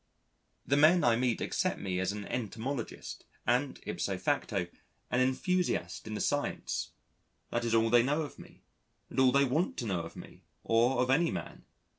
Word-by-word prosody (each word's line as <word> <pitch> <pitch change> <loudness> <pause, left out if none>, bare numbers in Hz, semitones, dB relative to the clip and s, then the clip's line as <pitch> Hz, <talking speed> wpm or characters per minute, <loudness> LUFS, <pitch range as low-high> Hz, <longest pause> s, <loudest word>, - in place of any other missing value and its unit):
The 140 - +2
men 160 +3 +6
I 120 -1 +5
meet 120 -1 0
accept - - 0
me 90 -2 -2
as 95 +1 0
an 105 0 -6
entomologist 120 +2 -4 0.2
and 125 +4 +1
ipso - - -2
facto, - - 0 0.5
an 125 - +2
enthusiast 165 +4 0
in 110 - -4
the - - -3
science. 145 0 -1 0.6
That 120 - 0
is 115 -1 +1
all 115 0 +3
they 120 -1 +7
know 145 +6 +1
of 145 - -9
me, - - -15 0.5
and - - -2
all 130 -1 +6
they 140 +2 +4
want 150 +8 0
to 120 - -3
know 95 -5 -1
of 85 - -9
me, - - -11 0.2
or 120 +3 +3
of 125 - 0
any 165 +5 +4
man. - - -6
125 Hz, 180 wpm, -31 LUFS, 115-140 Hz, 0.6 s, they